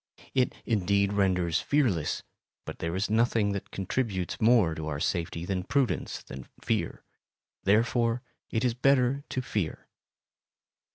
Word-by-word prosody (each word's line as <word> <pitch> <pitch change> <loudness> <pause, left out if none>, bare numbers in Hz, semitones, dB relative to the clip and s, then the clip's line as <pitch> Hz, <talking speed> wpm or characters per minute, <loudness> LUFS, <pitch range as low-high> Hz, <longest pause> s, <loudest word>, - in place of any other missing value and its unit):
It 130 -2 +2
indeed 100 -2 +2
renders 90 -4 +2
fearless, 110 - +1 0.4
but - - -7
there 85 +1 -2
is 95 +2 0
nothing 110 -1 +2
that 100 -1 -4
contributes 95 -1 -2
more 110 -7 +5
to 80 -1 -5
our 75 -2 -3
safety 85 +1 -1
than 95 0 -1
prudence 135 +4 0
and 65 -1 -8
fear; - - -2 0.6
therefore 115 +4 +2 0.3
it 115 +2 0
is 120 - +2
better 135 +2 +3
to 130 - -1
fear. 105 -10 -3
100 Hz, 130 wpm, -28 LUFS, 90-120 Hz, 0.6 s, more